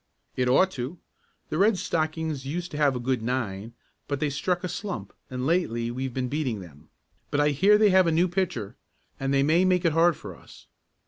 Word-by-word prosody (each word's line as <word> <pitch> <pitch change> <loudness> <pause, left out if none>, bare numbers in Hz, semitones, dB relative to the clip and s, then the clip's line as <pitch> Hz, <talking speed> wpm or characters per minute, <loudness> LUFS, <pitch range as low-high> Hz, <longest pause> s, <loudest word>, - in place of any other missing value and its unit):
"It 125 -1 0
ought 185 +9 +4
to. 135 +6 -5 0.5
The 155 - -2
Red 205 +1 +4
Stockings 155 -4 -2
used 170 +6 -4
to 145 - -5
have 145 -3 +3
a - - -2
good 125 -1 -1
nine 115 -3 -3 0.3
but 140 -1 -2
they 150 -1 0
struck 175 +6 -1
a - - -1
slump 195 +1 -5 0.2
and 125 0 -4
lately 120 -8 0
we've 130 +2 -3
been 125 +1 -2
beating 130 -6 -2
them. 80 -6 -14 0.4
But 145 - 0
I 145 0 +4
hear 195 +9 +4
they 210 -1 +4
have 185 -1 +5
a - - +3
new 170 +3 +3
pitcher 170 - -2 0.4
and 135 0 -1
they 135 0 +3
may 160 +5 +3
make 185 -1 +2
it 165 - +4
hard 165 +1 +4
for - - -9
us. - - -16
150 Hz, 210 wpm, -26 LUFS, 125-175 Hz, 0.5 s, have